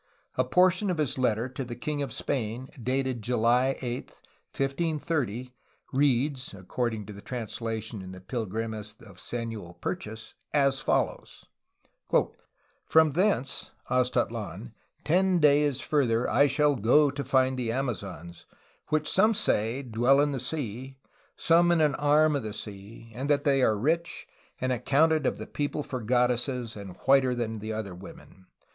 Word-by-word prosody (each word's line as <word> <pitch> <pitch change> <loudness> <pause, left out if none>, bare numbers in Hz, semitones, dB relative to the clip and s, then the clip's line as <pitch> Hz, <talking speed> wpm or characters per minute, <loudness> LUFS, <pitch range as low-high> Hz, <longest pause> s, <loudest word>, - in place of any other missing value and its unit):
A - - +2
portion 185 +2 +3
of 180 - 0
his 145 -4 0
letter 120 -1 +1
to 130 +1 -5
the 120 -1 -6
king 145 +4 -3
of 140 -3 -3
Spain, 120 +2 -3
dated 130 0 -1
July 125 +3 +2
8, 120 0 -3 0.4
1530, 135 -4 -2 0.4
reads 135 -2 +1
(according 110 +3 -3
to 105 - -9
the 100 - -11
translation 115 -2 -5
in 95 0 -8
the 95 - -9
Pilgrimes 110 +1 -4
of 95 -4 -15
Samuel 115 -7 -5
Purchas), 110 -10 -5 0.2
as 140 -2 +4
follows: - - -1 1.4
"From 160 -1 +5
thence 170 -5 0 0.2
[Aztatlan] 125 - -1 0.3
ten 185 +3 +3
dayes 145 -2 +4
further 125 -6 +1
I 140 +6 +4
shall 145 +1 +2
goe 140 +7 +4
to 140 0 -4
find 130 -1 +2
the 115 -2 -1
Amazons, 100 -9 -5 0.4
which 155 0 0
some 215 +4 +3
say 115 - 0
dwell 120 +3 +3
in 145 0 +3
the 135 - -2
Sea, 130 -1 -4 0.4
some 170 +1 +4
in 170 - +3
an 150 -2 +3
arme 150 +2 +3
of 140 - 0
the 110 -2 -5
Sea, 105 +3 -9
and 135 +5 -4
that 145 -1 +3
they 135 -2 +3
are 110 -4 +3
rich, 165 +9 -1 0.3
and 130 0 -1
accounted 150 +6 +2
of - - -1
the - - -6
people 145 +1 -3
for 130 -3 -5
God 125 +2 +3
desses, 125 -1 -3
and 100 -3 -8
whiter 135 -2 +5
than 110 -3 -3
other 110 -3 -4
women. 95 0 -13
125 Hz, 150 wpm, -28 LUFS, 110-145 Hz, 1.4 s, From